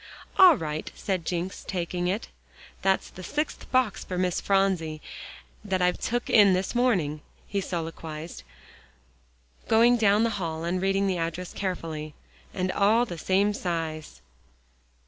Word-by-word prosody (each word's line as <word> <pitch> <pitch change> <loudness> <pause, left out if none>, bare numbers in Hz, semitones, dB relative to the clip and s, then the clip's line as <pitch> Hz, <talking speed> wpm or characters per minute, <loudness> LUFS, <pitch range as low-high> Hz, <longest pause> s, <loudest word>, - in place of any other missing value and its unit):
"All 365 -6 +9
right," 155 -1 -4
said 185 -4 -2
Jencks, 180 +2 -3
taking 175 -1 -2
it. 200 +6 -2 0.5
"That's 190 0 +1
the 185 - -10
sixth 295 - -3
box 255 -6 +1
for 180 - -5
Miss 180 -1 0
Phronsie 190 -6 +1 0.6
that 190 -3 -1
I've 180 0 +1
took 240 +1 -2
in 205 -4 +6
this 185 +1 -1
morning," 185 -12 +1 0.3
he 200 0 -1
soliloquized, 165 -2 -5 1.3
going 235 +2 +5
down 210 -1 +4
the 230 - +1
hall 160 -1 -3
and 180 +2 -1
reading 195 +1 +1
the 185 -3 0
address 165 +2 -4
carefully. 160 -5 -4 0.4
"And 185 -1 -1
all 220 +5 +3
the 175 -8 -7
same 195 +5 +2
size." 160 - -4
185 Hz, 140 wpm, -27 LUFS, 165-205 Hz, 1.3 s, All